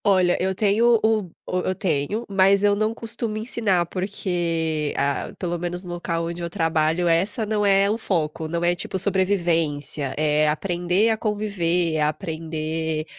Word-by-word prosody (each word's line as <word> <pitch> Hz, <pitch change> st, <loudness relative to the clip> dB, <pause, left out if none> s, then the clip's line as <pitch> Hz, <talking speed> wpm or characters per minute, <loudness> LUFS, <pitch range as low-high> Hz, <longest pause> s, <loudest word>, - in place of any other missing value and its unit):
Olha, 185 Hz, -3 st, +4 dB
eu 190 Hz, +1 st, 0 dB
tenho 225 Hz, +4 st, +3 dB
o 220 Hz, 0 st, +3 dB
b 180 Hz, -4 st, -11 dB
o 185 Hz, -, -1 dB
eu 185 Hz, +1 st, -1 dB
tenho, 185 Hz, +6 st, -1 dB
mas 195 Hz, 0 st, +3 dB
eu 205 Hz, 0 st, +4 dB
não 215 Hz, +1 st, +1 dB
costumo 230 Hz, -1 st, -4 dB
ensinar 215 Hz, -6 st, 0 dB
porque, 170 Hz, -5 st, -2 dB
ah 140 Hz, 0 st, -1 dB
pelo 175 Hz, -2 st, -3 dB
menos 175 Hz, +1 st, -3 dB
no 175 Hz, -1 st, -6 dB
local 170 Hz, -1 st, -2 dB
onde 170 Hz, +1 st, -5 dB
eu 170 Hz, -, -3 dB
trabalho 165 Hz, +1 st, +1 dB
essa 190 Hz, +7 st, +1 dB
não 210 Hz, 0 st, 0 dB
é 195 Hz, 0 st, +4 dB
o 215 Hz, -, 0 dB
foco, 160 Hz, -6 st, -1 dB
não 170 Hz, +2 st, -2 dB
é 175 Hz, 0 st, +3 dB
tipo 185 Hz, +1 st, -3 dB
sobrevivência, 170 Hz, -8 st, 0 dB
é 150 Hz, 0 st, +2 dB
aprender 180 Hz, +5 st, +1 dB
a 220 Hz, -, +1 dB
conviver, 185 Hz, -6 st, 0 dB
é -, -, 0 dB
aprender 160 Hz, 0 st, -2 dB
175 Hz, 170 wpm, -23 LUFS, 160-200 Hz, -, Olha